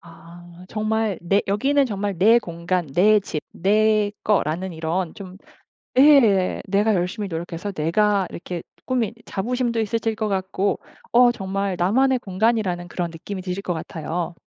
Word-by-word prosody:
아 170 Hz, +1 st, -14 dB
정말 215 Hz, -2 st, -1 dB
내 195 Hz, +4 st, +2 dB
여기는 275 Hz, +8 st, +2 dB
정말 205 Hz, -3 st, -3 dB
내 220 Hz, +6 st, +6 dB
공간, 170 Hz, -3 st, -3 dB
내 210 Hz, +6 st, +5 dB
집, 155 Hz, -6 st, -5 dB
내 210 Hz, +2 st, +2 dB
거라는 185 Hz, -2 st, 0 dB
이런 165 Hz, +2 st, -2 dB
좀 190 Hz, -3 st, -10 dB, 0.6 s
예 240 Hz, -10 st, +5 dB
내가 205 Hz, +3 st, +2 dB
열심히 190 Hz, +3 st, -2 dB
노력해서 170 Hz, +3 st, -5 dB
내가 195 Hz, +4 st, +1 dB
이렇게 175 Hz, -1 st, -6 dB, 0.2 s
꾸민 245 Hz, -4 st, 0 dB
자부심도 240 Hz, +3 st, -2 dB
있으실 225 Hz, +1 st, -1 dB
것 215 Hz, 0 st, -2 dB
같고 195 Hz, 0 st, -1 dB, 0.3 s
어 245 Hz, 0 st, +6 dB
정말 195 Hz, -3 st, -3 dB
나만의 255 Hz, +9 st, +3 dB
공간이라는 190 Hz, -3 st, 0 dB
그런 175 Hz, -1 st, -3 dB
느낌이 185 Hz, +4 st, -7 dB
드실 180 Hz, +1 st, -4 dB
것 180 Hz, -, -2 dB
같아요. 165 Hz, +2 st, -4 dB
195 Hz, 290 characters per minute, -22 LUFS, 175-215 Hz, 0.6 s, 내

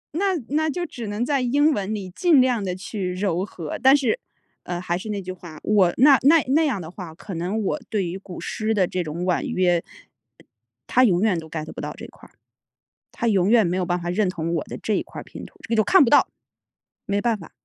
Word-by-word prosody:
那 385 Hz, +2 st, +1 dB
那 310 Hz, +2 st, +1 dB
就 350 Hz, +3 st, -2 dB
只 240 Hz, -8 st, -7 dB
能 210 Hz, +4 st, -2 dB
在 275 Hz, -1 st, +1 dB
英 290 Hz, +5 st, +3 dB
文 205 Hz, -1 st, -2 dB
里 195 Hz, -3 st, -5 dB
尽 340 Hz, -, +4 dB
量 245 Hz, -4 st, +1 dB
地 180 Hz, -2 st, -2 dB
去 185 Hz, -1 st, -4 dB
揉 185 Hz, -1 st, -1 dB
合， 165 Hz, -6 st, -7 dB
但 265 Hz, +2 st, +7 dB
是， 365 Hz, -, 0 dB, 0.4 s
呃， 175 Hz, -1 st, -4 dB
还 175 Hz, -1 st, -2 dB
是 215 Hz, +4 st, -7 dB
那 205 Hz, -1 st, -2 dB
句 185 Hz, 0 st, -6 dB
话， 175 Hz, -4 st, -11 dB
我 195 Hz, -5 st, +3 dB
那 270 Hz, +1 st, +7 dB
那 310 Hz, +3 st, +6 dB
那 315 Hz, +4 st, +3 dB
样 230 Hz, -8 st, -1 dB
的 160 Hz, -, -8 dB
话， 180 Hz, -4 st, -9 dB
可 190 Hz, +3 st, -9 dB
能 185 Hz, +6 st, -2 dB
我 250 Hz, +10 st, -1 dB
对 205 Hz, -4 st, 0 dB
于 170 Hz, -, -4 dB
古 185 Hz, -2 st, -10 dB
诗 220 Hz, 0 st, -2 dB
的 190 Hz, -3 st, +3 dB
这 180 Hz, -, -2 dB
种 165 Hz, +3 st, -4 dB
婉 180 Hz, -1 st, +1 dB
约 175 Hz, -2 st, +1 dB, 1.0 s
他 255 Hz, -, +4 dB
永 190 Hz, -6 st, +3 dB
远 205 Hz, -6 st, +2 dB
都 160 Hz, -1 st, -10 dB
Get 155 Hz, -1 st, -5 dB
不 -, -, -7 dB
到 -, -, -5 dB
这 -, -, -8 dB
块 -, -, -17 dB
儿， -, -, -31 dB, 0.8 s
他 235 Hz, -, -2 dB
永 195 Hz, -3 st, +2 dB
远 230 Hz, -3 st, +5 dB
没 180 Hz, -, -1 dB
有 185 Hz, -, 0 dB
办 175 Hz, 0 st, -1 dB
法 175 Hz, -, -4 dB
认 200 Hz, +3 st, +1 dB
同 170 Hz, -2 st, -3 dB
我 160 Hz, -, -1 dB
的 -, -, -8 dB
这 215 Hz, -, 0 dB
一 -, -, 0 dB
块 -, -, -9 dB
儿 -, -, -10 dB
拼 -, -, -10 dB
图。 -, -, -17 dB
这 -, -, -10 dB
个 230 Hz, -, +1 dB
就 215 Hz, -, +4 dB
看 380 Hz, -, +6 dB
不 235 Hz, -, +2 dB
到， -, -, +5 dB, 0.8 s
没 200 Hz, 0 st, 0 dB
办 230 Hz, -1 st, +1 dB
法。 170 Hz, -5 st, -12 dB
200 Hz, 270 characters per minute, -23 LUFS, 180-250 Hz, 1.0 s, 但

